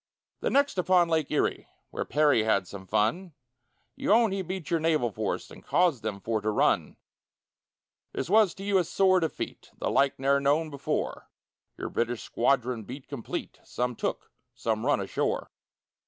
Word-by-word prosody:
The - - -1
next 280 -8 +2
upon 180 -1 +4
Lake 160 -3 +1
Erie, 150 - 0 0.2
Where - - -3
Perry 145 -6 +3
had 100 -4 +1
some 95 0 -9
fun, 130 - 0 0.6
You - - -1
own 225 -1 +5
he 195 0 -1
beat 185 -2 -6
your 165 - +3
naval 155 -7 +1
force, 105 0 -3
And - - -13
caused 170 -9 +2
them 105 -2 -4
for 110 +1 -2
to 110 - -1
run; 105 - +1 1.1
This - - -3
was 205 -1 +4
to 195 - -9
you 200 -1 +3
a - - +2
sore 185 +2 +3
defeat, 160 -3 -4
The - - -2
like 140 0 +2
ne'er 140 +1 +2
known 150 +3 +1
before 140 - -3 0.5
Your - - -4
British 120 0 -2
squadron 125 -1 +1
beat 130 +6 -9
complete 140 -5 -6
Some 125 0 -2
took, - - -3 0.2
some 110 +2 -1
run 145 - +3
ashore. 100 - -2
140 Hz, 170 wpm, -28 LUFS, 115-180 Hz, 1.1 s, own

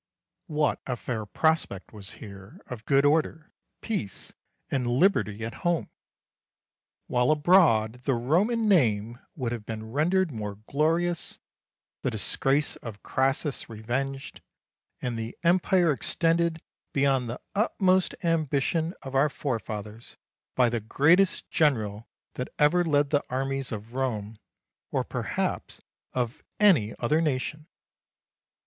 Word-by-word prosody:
What 150 -3 0
a 125 - -1
fair 110 -3 -4
prospect 155 - 0
was 100 -2 -9
here 100 -2 -11
of 115 -3 -8
good 140 0 +4
order, 155 +1 +1 0.3
peace, 155 - -4 0.4
and 130 -3 0
liberty 120 - +2
at 115 - -5
home, 175 -2 0 1.1
while 125 0 +1
abroad 145 - +4
the 135 - +2
Roman 195 - +1
name 120 - +2 0.2
would 125 -6 -2
have 120 -3 -4
been 110 0 -6
rendered 175 +6 +2
more 105 -4 -5
glorious, 165 +4 0 0.6
the - - 0
disgrace 135 +6 0
of 110 -4 -9
Crassus 135 +2 -1
revenged, 130 +5 -4 0.6
and 120 -2 -2
the 115 +1 -6
Empire 175 0 +4
extended 165 +3 0 0.3
beyond 135 -3 +2
the 120 - -5
utmost 190 -3 +2
ambition 160 +1 0
of 135 - -7
our 135 +3 +4
forefathers 110 -5 -5 0.4
by 125 -1 +4
the 120 0 0
greatest 160 - +3
general 115 -8 +1 0.3
that 125 - -4
ever 160 +4 +4
led 145 -3 +2
the 145 -1 +2
armies 135 +1 -2
of 110 +1 -7
Rome, 110 -5 -3 0.5
or, - - 0
perhaps, - - -3 0.3
of 125 +1 -2 0.2
any 165 - +4
other 150 +7 +1
nation! 150 +1 -2
135 Hz, 120 wpm, -27 LUFS, 115-160 Hz, 1.1 s, good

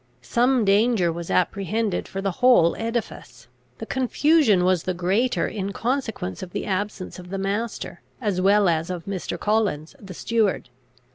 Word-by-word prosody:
Some 245 - +2
danger 200 -3 +3
was 170 0 -7
apprehended 200 +2 0
for 195 0 -5
the 195 - 0
whole 245 -10 +5
edifice. 225 - -5 0.3
The - - -6
confusion 260 - +3
was 185 -2 +2
the 185 +1 -3
greater, 195 +8 +1
in 200 -2 -4
consequence 230 - -3
of 180 -1 -8
the 205 - -3
absence 195 -1 -3
of 180 0 -11
the 195 - -4
master, 200 -1 -3 0.2
as 205 -7 -1
well 200 +1 +4
as 165 0 0
of 175 -3 -5
Mr. 195 -2 -4
Collins, 210 - 0
the 195 -3 -10
steward. 220 - 0
200 Hz, 155 wpm, -23 LUFS, 180-225 Hz, 0.3 s, whole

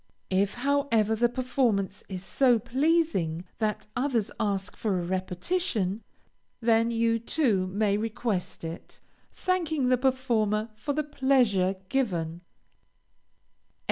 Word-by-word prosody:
If, 195 +1 +1
however, 245 -5 +1
the 240 +2 +2
performance 240 -6 0
is 185 -1 -5
so 250 0 +4
pleasing 255 - +1
that 215 -2 -1
others 250 -5 0
ask 195 -3 -1
for 205 -4 -1
a 175 - -3
repetition, 190 - -1 0.6
then 230 -1 +3
you 230 0 +1
too 225 -7 +1
may 200 +1 +1
request 215 -4 -3
it, 165 +1 -8 0.3
thanking 320 -8 0
the 255 -1 +3
performer 235 -5 +1
for 215 +7 -3
the 305 +1 0
pleasure 255 -10 +2
given. 175 -10 -1
225 Hz, 110 wpm, -27 LUFS, 195-265 Hz, 0.6 s, so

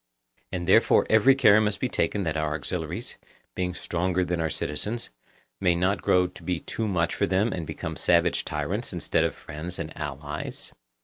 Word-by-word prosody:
And 85 -2 -3
therefore 105 +5 +5
every 110 +5 +6
care 110 -6 +6
must 105 -2 0
be 130 - 0
taken 105 -4 0
that 80 -3 -1
our 75 -1 -1
auxiliaries, 75 - -5 0.3
being 90 -1 -2
stronger 90 +1 0
than 85 -1 -1
our 80 - 0
citizens, 105 +13 -3 0.5
may 90 -1 +3
not 90 +2 +1
grow 90 0 +3
to 90 - -9
be 90 -2 -2
too 110 - -3
much 85 -4 0
for 100 - 0
them 100 +5 +1
and 80 -3 -4
become - - -5
savage - - +2
tyrants - - -3
instead - - +1
of - - -1
friends 80 +4 -7
and 80 -1 -6
allies? 75 0 -5
90 Hz, 180 wpm, -26 LUFS, 80-100 Hz, 0.5 s, every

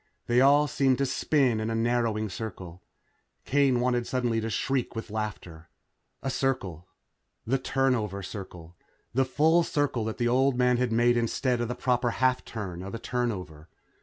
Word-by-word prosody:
They 120 +1 +3
all 145 +2 +5
seemed 135 -2 +2
to 140 - +1
spin 130 -3 +1
in 110 +1 -2
a 115 - -1
narrowing 115 -2 0
circle. 90 -4 -7 0.6
Kane 135 -3 +3
wanted 120 -1 0
suddenly 120 -3 0
to 110 - -3
shriek 130 +1 -1
with 115 -1 -6
laughter. 95 -7 -6 0.5
A 135 - -1
circle. 95 - -2 0.6
The 135 +4 +1
turnover 125 -7 0
circle. 90 -4 -9 0.4
The 135 +2 +2
full 155 +6 +3
circle 145 -7 -1
that 110 - -4
the 120 - +1
old 130 +1 +2
man 125 -1 +3
had 125 -1 0
made 120 +1 +3
instead 120 +1 0
of 120 - -1
the 125 - -3
proper 125 -1 +1
half 130 +2 +1
turn 95 -6 -6
of 100 +4 -6
a - - -3
turnover. 95 -11 -4
120 Hz, 165 wpm, -27 LUFS, 110-130 Hz, 0.6 s, all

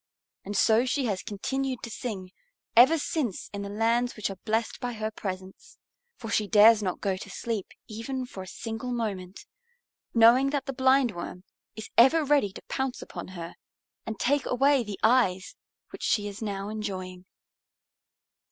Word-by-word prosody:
And 205 +1 -4
so 225 +3 +4
she 260 +1 0
has 200 -5 -1
continued 260 +5 -3
to 235 - -6
sing 195 -6 -5 0.4
ever 260 +8 +7
since 285 - -3
in 200 - -4
the 200 - -5
lands 230 +4 +1
which 215 -2 -2
are - - -6
blessed 225 +1 -1
by 245 0 -3
her 215 -1 -3
presence. 190 -2 -7 0.4
For 225 -1 -7
she 210 -2 +1
dares 215 +1 +7
not 185 -3 -3
go 195 -2 0
to 200 - -9
sleep 215 0 -3 0.2
even 250 +4 -4
for 200 -6 -9
a 185 - -9
single 225 +5 -5
moment, 200 -5 -4 0.7
knowing 235 +4 +6
that 280 -2 -2
the 270 - -4
Blindworm 255 -9 +1 0.3
is 220 -1 -8
ever 300 +6 +6
ready 280 -8 +3
to - - -10
pounce 265 -1 -3
upon - - -8
her 170 0 -6 0.5
and 220 -2 -6
take 285 +2 +1
away 270 +1 +3
the 210 -3 -7
eyes 220 -6 +2 0.4
which - - -10
she 205 -2 +1
is 205 +1 -8
now 200 -2 -3
enjoying. 185 -4 -5
220 Hz, 165 wpm, -27 LUFS, 200-250 Hz, 0.7 s, ever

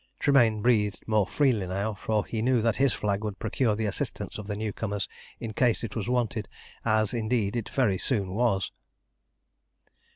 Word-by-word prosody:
Tremayne 120 -7 +4
breathed 105 -5 +2
more 105 -3 +3
freely 120 -9 +2
now, 100 +4 -1
for 105 +1 -1
he 110 - -3
knew 125 -1 +2
that 115 -2 +2
his 135 -1 +4
flag 105 -1 -1
would 105 -2 -3
procure 110 0 0
the 110 +1 -1
assistance 105 - -3
of 105 - -7
the 105 - -2
new 105 0 -3
comer 105 -2 -3 0.4
in 115 -2 -5
case 120 +1 +2
it 110 -3 -5
was 110 -1 -2
wanted, 120 -4 0 0.3
as 110 -2 +2
indeed 115 -2 0
it 115 -3 -2
very 105 -9 +1
soon 100 -8 0
was. 105 -3 +1
110 Hz, 175 wpm, -28 LUFS, 105-120 Hz, 0.4 s, Tremayne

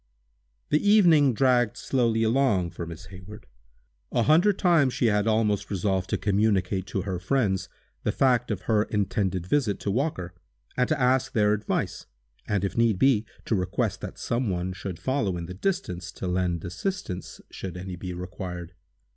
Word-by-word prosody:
The 150 - +3
evening 175 -9 +5
dragged 125 -3 +2
slowly 115 -4 +1
along 110 -7 +2
for 85 - -6
Miss 85 +2 -9
Hayward. 95 +3 -11 0.7
A 120 - +2
hundred 175 - +4
times 165 -8 +3
she - - +1
had 105 -1 +2
almost 110 -2 +1
resolved 95 -1 -1
to - - 0
communicate 100 -2 +1
to 95 - -2
her 95 -3 -3
friends 95 -1 0 0.3
the - - 0
fact 125 -2 +2
of 105 -4 -2
her 110 -2 +2
intended 95 -3 -1
visit 110 -1 +1
to 100 - -1
Walker, 100 - -2 0.4
and 125 -1 +1
to - - +1
ask 130 +1 +2
their 105 -3 +3
advice, 105 +1 -2 0.4
and, 100 -2 0
if 95 - -4
need 115 -4 +3
be, 115 -2 +3 0.2
to - - -1
request 90 -3 -1
that - - -7
some 120 -1 -1
one 90 0 -2
should 90 -1 -6
follow 100 - -1
in 85 - -5
the 90 - -7
distance, 95 - -3
to - - -6
lend 90 -2 -1
assistance, 95 - -4
should 90 -2 -6
any 90 0 -6
be 90 +1 -6
required. 90 -1 -6
105 Hz, 170 wpm, -26 LUFS, 90-125 Hz, 0.7 s, evening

